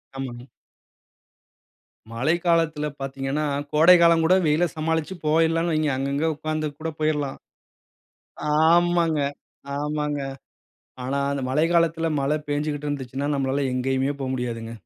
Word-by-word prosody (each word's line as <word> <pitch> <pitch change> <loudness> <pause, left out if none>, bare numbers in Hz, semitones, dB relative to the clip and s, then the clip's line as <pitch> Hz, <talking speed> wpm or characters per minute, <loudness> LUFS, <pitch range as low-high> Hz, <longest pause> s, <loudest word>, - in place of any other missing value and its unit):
ஆமாங்க. 125 -2 -6 1.7
மழை 135 +9 +1
காலத்துல 165 -3 +2
பார்த்தீங்கன்னா, 135 +2 -2 0.3
கோடை 165 +4 +7
காலம் 170 -1 +5
கூட 185 +3 +5
வெயில 155 +4 +3
சமாளிச்சு 160 +3 -1
போயிரலாணு 165 +2 +2
வைங்க. 155 -1 +1
அங்க 135 +1 -2
அங்க 150 +3 0
உட்கார்ந்து 155 0 -2
கூட 160 +1 -3
போயிர்லாம். 150 -3 -1 1.1
ஆமாங்க 170 0 +3 0.6
ஆமாங்க. 150 0 -2 0.8
ஆனா 135 +2 -2
அந்த 140 -1 -2
மழை 150 +5 +2
காலத்தில 165 -1 +2
மழ 135 +1 0 0.2
பெஞ்சுகுட்டு 145 0 -2
இருந்துச்சுன்னா 135 0 -3
நம்மளால 135 +1 0
எங்கேயுமே 135 +2 0
போ 135 - -3
முடியாதுங்க. 115 -3 -4
150 Hz, 115 wpm, -24 LUFS, 135-160 Hz, 1.7 s, கோடை